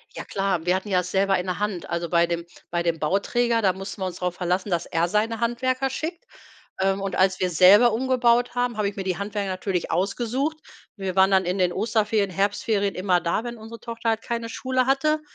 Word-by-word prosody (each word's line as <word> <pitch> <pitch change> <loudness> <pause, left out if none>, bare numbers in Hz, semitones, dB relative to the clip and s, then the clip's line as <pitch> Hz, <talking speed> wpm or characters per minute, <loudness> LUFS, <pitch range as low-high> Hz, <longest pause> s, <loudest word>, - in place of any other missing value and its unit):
Ja - - -6
klar, 195 -4 -1
wir 180 +1 +3
hatten 190 +3 -4
ja 185 -2 +3
es 180 0 -7
selber 195 0 +2
in 180 - -3
der 180 +1 -3
Hand. 205 -5 -3
Also, 170 0 -2
bei 170 -1 +4
dem 170 0 -3 0.3
bei 170 0 0
dem 170 -1 0
Bauträger, 230 +8 +1
da 190 -3 +3
mussten 195 +1 -8
wir 185 - 0
uns 180 0 -6
drauf 180 -1 -2
verlassen, 180 +2 -1
dass 175 -1 0
er 165 +1 +1
seine 215 +4 0
Handwerker 255 +3 0
schickt. 325 +6 -5 0.6
Ähm, 195 0 +1
und 195 -1 -3
als 190 0 +2
wir 185 - +1
selber 195 +8 +7
umgebaut 245 -1 +2
haben, 245 -2 -1
habe 210 -2 +1
ich 200 - -11
mir 195 - -4
die 185 -2 -2
Handwerker 200 -1 -3
natürlich 185 -1 -2
ausgesucht. 245 - -1 0.4
Wir 190 -3 -4
waren 190 0 +5
dann 190 -1 +3
in 180 +2 -1
den 180 -1 +2
Osterferien, 210 -1 +1
Herbstferien 200 +1 0
immer 185 -1 +2
da, 170 +7 -1
wenn 240 -1 -6
unsere 225 +1 -10
Tochter 230 0 -3
halt 225 0 0
keine 235 -1 -3
Schule 255 +1 0
hatte. 305 +3 +2
200 Hz, 225 wpm, -24 LUFS, 185-235 Hz, 0.6 s, selber